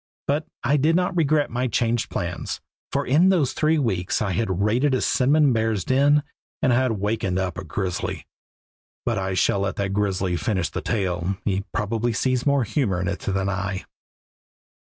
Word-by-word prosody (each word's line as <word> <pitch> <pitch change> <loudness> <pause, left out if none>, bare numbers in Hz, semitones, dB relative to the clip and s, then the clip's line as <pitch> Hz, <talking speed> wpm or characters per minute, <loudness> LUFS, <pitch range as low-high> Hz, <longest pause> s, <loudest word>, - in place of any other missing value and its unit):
But 150 +3 0 0.2
I 145 - +3
did 155 +4 +3
not 180 +1 +1
regret 155 -3 +2
my 125 +2 0
changed 115 0 0
plans, - - -4 0.3
for - - 0
in 160 +8 +4
those 160 -9 +2
three 155 +1 +2
weeks 95 - 0
I 105 -3 -1
had 95 0 0
raided 125 +6 +2
a 130 - 0
cinnamon 140 +1 +3
bear's 110 -4 0
den 140 +3 +4 0.4
and 125 - +2
had 125 -1 +2
wakened 105 -2 -1
up 95 -3 -1
a - - -5
grizzly 90 -2 -3 0.8
But 115 -4 0
I 95 -1 -2
shall 100 - +2
let 100 0 -1
the 100 -1 -1
grizzly 95 -3 0
finish 90 -6 -1
the - - -3
tale; 95 -3 -1
he 100 0 0
probably 115 +2 -1
sees 130 +3 0
more 140 -2 +3
humor 110 -5 0
in 90 - -2
it 100 0 -2
than 95 0 -1
I. 95 0 -2
110 Hz, 175 wpm, -23 LUFS, 95-135 Hz, 0.8 s, in